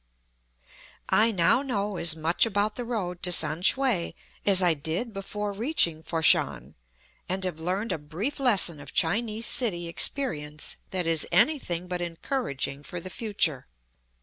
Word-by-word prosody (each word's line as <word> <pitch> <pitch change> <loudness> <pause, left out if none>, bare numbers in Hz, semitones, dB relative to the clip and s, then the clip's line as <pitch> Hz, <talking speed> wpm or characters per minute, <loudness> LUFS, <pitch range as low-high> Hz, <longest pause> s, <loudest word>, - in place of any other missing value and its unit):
I 220 +2 +4
now 190 +6 +2
know 210 -7 -3
as 165 -2 +5
much 160 +2 +1
about 210 0 -1
the 245 - -4
road 195 -7 -4
to 180 - +3
Sam 155 -1 +4
shue 235 -4 +1 0.3
as 195 -2 +6
I 175 -3 +4
did 160 - -4
before 205 +1 -5
reaching 200 - 0
Fat 165 0 -4
shan, 65 - +3 0.6
and 190 +1 -2
have 180 -4 -2
learned 185 +7 -3
a - - -3
brief 185 - -5
lesson 200 - +4
of 145 - -10
Chinese 215 +6 0
city 180 -10 +1
experience 155 - 0
that 185 -2 -3
is 165 -2 0
anything 180 - +1
but 180 -1 -4
encouraging 165 - -4
for 175 +4 -7
the 185 +2 -9
future. 175 - 0
180 Hz, 150 wpm, -26 LUFS, 165-220 Hz, 0.6 s, as